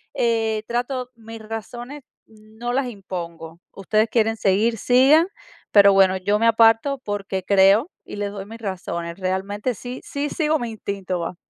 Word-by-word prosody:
eh 225 -2 0
trato 245 +1 -3
mis 225 0 -11
razones 240 +5 -7 0.2
no 220 +2 -7
las 265 -1 0
impongo. 170 -6 -7
Ustedes 215 +3 +1
quieren 225 -1 +1
seguir, 215 +4 +1
sigan, 270 - +5 0.4
pero 200 -1 +7
bueno, 190 -1 +4
yo 205 +3 0
me 230 - +3
aparto 230 +4 +4
porque 195 -2 -3
creo 200 - +4
y - - -8
les 205 -1 -3
doy 195 -1 -7
mis 225 +2 -10
razones. 175 -3 -5
Realmente 200 +6 -2
sí 245 +5 -8
sí 290 +1 -3
sigo 310 -1 +1
mi 235 -2 -4
instinto, 195 -4 -4
va. 170 +1 -4
220 Hz, 155 wpm, -22 LUFS, 195-240 Hz, 0.4 s, pero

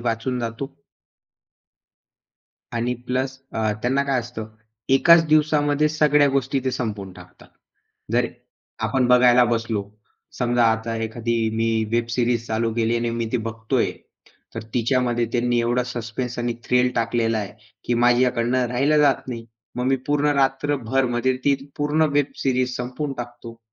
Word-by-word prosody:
वाचून 120 +2 -2
जातो 115 +3 -4 2.1
आणि 120 +1 0
प्लस 130 +1 -2
अ, 110 -1 0
त्यांना 135 +3 +2
काय 135 -2 +1
असतं? 115 -2 -7 0.4
एकाच 165 +5 +6
दिवसामध्ये 150 -1 +3
सगळ्या 150 -1 +3
गोष्टी 135 0 0
ते 130 - +1
संपवून 105 -6 -4
टाकतात. 90 0 -15 0.7
जर - - +3 0.6
आपण 130 -2 +1
बघायला 125 0 +6
बसलो, 115 -3 -1 0.6
समजा 120 -1 +2
आता 115 +1 -3
एखादी 115 +1 -2 0.2
मी 115 0 +1 0.2
वेब 120 0 +1
सिरीज 120 -1 0
चालू 115 0 -1
केली 115 0 +1
आणि 120 0 -1
मी 115 0 -2
ती - - +3
बघतोय, 115 0 -1 0.6
तर - - -5
तिच्यामध्ये 120 0 +1
त्यांनी 120 -1 +1
एवढा 120 +1 +1
सस्पेन्स 120 0 -5
आणि 120 0 -1
थ्रिल 125 0 +2
टाकलेला 115 -1 +1
आहे, 100 -2 -5 0.3
की 120 - 0
माझ्याकडून 120 0 +2
राहिलं 130 +5 +2
जात 140 -3 +2
नाही. 115 -2 -5 0.3
मग 125 - -1
मी 135 +1 +3
पूर्ण 145 0 +1
रात्रभरमध्ये 135 -2 +1
ती 140 - +4 0.2
पूर्ण 150 +2 +1
वेब 145 -1 +2 0.2
सिरीज 130 -1 0
संपवून 130 +4 -4
टाकतो. 120 -1 -8
125 Hz, 140 wpm, -22 LUFS, 115-135 Hz, 2.1 s, एकाच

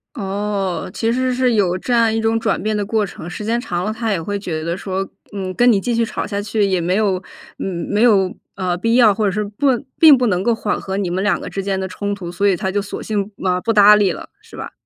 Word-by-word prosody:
哦， 200 -4 -3
其 225 +1 0
实 255 +1 0
是 250 -1 +2
有 185 -4 +2
这 245 +6 -3
样 230 -2 +3
一 225 - 0
种 225 0 +1
转 215 -6 -1
变 215 +2 -1
的 205 - 0
过 215 0 0
程， 175 -3 -9
时 210 - -6
间 235 +2 0
长 175 -6 -3
了， 215 - -1
他 225 0 -3
也 190 -5 -1
会 205 +4 -3
觉 160 -5 -4
得 170 +1 -2
说， 190 0 -3 0.3
嗯， 190 -2 -4
跟 245 +6 +4
你 205 - +3
继 240 +5 -2
续 230 0 +2
吵 225 - -3
下 200 -1 -3
去， 210 0 0
也 190 -3 0
没 180 +2 0
有 195 -3 +1 0.4
没 195 +3 -2
有， 200 -6 +3 0.2
啊， 185 -2 -1
必 230 +6 0
要， 230 -4 +6
或 215 +1 -1
者 200 - +2
是 210 +2 -1
不 210 +7 -2 0.3
并 310 -4 +8
不 250 - +1
能 180 -4 +1
够 230 +3 +1
缓 210 -2 -2
和 190 0 -4
你 190 -3 -2
们 185 +2 -1
两 205 - +1
个 - - -7
之 195 - -4
间 195 0 -2
的 190 - -3
冲 205 +2 -3
突， 175 -4 -7
所 200 +3 0
以 195 - +3
他 190 +2 -2
就 205 +1 0
索 200 - -7
性， 205 -1 -2
呃， 180 -1 +1
不 230 - 0
搭 210 -1 +7
理 205 -3 +3
了， - - -8
是 455 - -15
吧？ - - -6
205 Hz, 290 characters per minute, -19 LUFS, 190-225 Hz, 0.4 s, 并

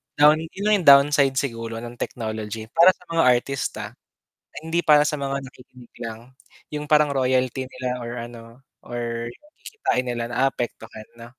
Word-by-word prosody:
down 150 +1 +6
'yun 165 +5 -7
lang 215 - +4
'yung 170 - -6
downside 140 -1 +6
siguro 115 -4 -3
ng 120 0 -9
technology 110 -1 -5
para 175 +3 +6
sa - - -22
mga 165 0 +3
artista, 125 +2 0 0.5
ah, - - -26
hindi 165 +1 -1
para 150 -1 +6
sa 150 - -2
mga 140 0 -3
nakikinig 125 -2 -15
lang. 115 -1 -6 0.5
'Yung 150 0 -3
parang 150 0 +4
royalty 130 -1 0
nila 125 -1 -4
or 120 - -6
ano 115 +1 -11 0.2
or 120 -1 -4 0.3
kikitain 130 - -2
nila, 120 0 -3
naapektuhan 120 -4 -3
'no. 115 - -11
130 Hz, 160 wpm, -23 LUFS, 120-145 Hz, 0.5 s, down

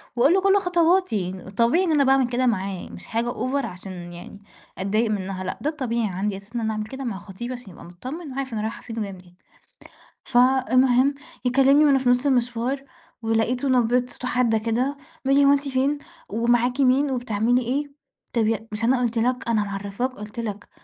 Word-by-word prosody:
وأقول 270 +7 +4
له 385 - +3
كُل 390 +1 +4
خطواتي، 340 - +1
طبيعي 235 +11 +4
إن 350 - +1
أنا 295 -2 +4
باعمل 265 -1 +4
كده 250 +1 0
معاه، 195 -5 -1
مش - - -10
حاجة 235 +2 -1
over 260 +4 -1
عشان 185 +1 -8 0.2
يعني 175 +3 -10 0.4
أتضايق 215 +4 0
منها، 190 -2 -3
لأ، 185 - -4
ده 295 - 0
الطبيعي 235 -7 -1
عندي 195 +2 -2
أساسًا 200 +4 -14
إن 235 - 0
أنا 220 0 0
أعمل 215 0 -3
كده 265 +3 -7
مع 225 -6 -3
خطيبي، 205 +5 -7
عشان 245 -6 -9
يبقى - - -13
متطمّن 260 - -8
وعارف 265 -2 -4
أنا 215 - -2
رايحة 220 +1 -4
فين 230 -1 -6
وجاية 205 -2 -3
منين. 180 -2 -14 0.9
فالمهم 255 +1 +4 0.3
يكلّمني 275 +4 +5
وأنا 280 -2 +5
في 255 -1 +1
نُص 245 +2 +3
المشوار، 250 0 0 0.4
ولقيته 230 +4 0
نبرة 250 -1 +3
صوته 250 0 -7
حادة 245 -3 +2
كده، 240 +6 -1 0.3
بيقول 275 +1 +4
لي: 280 - +5
"هو 280 - +6
أنتِ 285 0 0
فين 270 +2 +1 0.3
ومعاكِ 240 +4 +1
مين 270 +2 +3
وبتعملي 245 -1 +1
إيه؟" 280 +4 -2 0.4
طَب 225 -3 +2
ي 225 0 -1
مش 210 +1 -4
أنا 250 +2 +3
قُلت 240 -1 -1
لك، 245 +1 0
أنا 220 -2 +2
معرّفاك، 200 +5 -3
قلت 210 -2 -9
لك، 210 -3 -5
245 Hz, 195 wpm, -24 LUFS, 215-265 Hz, 0.9 s, هو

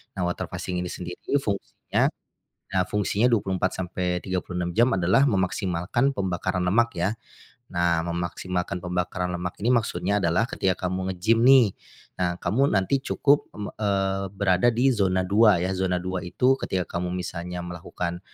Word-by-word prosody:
Nah 95 - -2
water 90 0 -2
fasting 90 -1 -4
ini 90 - -3
sendiri 90 +10 -5
fungsinya 100 -5 -1 0.7
nah 95 - +4
fungsinya 105 +5 +1
24-36 90 -3 -1
jam 120 +3 +4
adalah 95 +10 +3
memaksimalkan 95 +5 0
pembakaran 95 -5 -2
lemak 115 +6 +3
ya. 90 +5 0 0.6
Nah 85 -2 +1
memaksimalkan 85 +1 -3
pembakaran 90 0 -2
lemak 90 0 -4
ini 120 - +3
maksudnya 105 -3 +1
adalah 90 +3 +2
ketika 95 -1 -1
kamu 95 0 -2
ngegim 110 +6 +2
nih, 130 +1 +7 0.5
nah 90 -1 +1
kamu 135 +6 +2
nanti 95 +8 +2
cukup, 145 +1 +2
mmm, 105 -1 -5
eee, 95 -2 0
berada 95 +2 +2
di 125 +4 +3
zona 95 -5 +1
2 100 0 +4
ya, 95 - 0
zona 90 -1 0
2 95 0 -2
itu 130 +9 +2
ketika 95 -1 -1 0.2
kamu 90 0 -2
misalnya 90 0 -5
melakukan, 85 0 -5
95 Hz, 145 wpm, -25 LUFS, 90-105 Hz, 0.7 s, nih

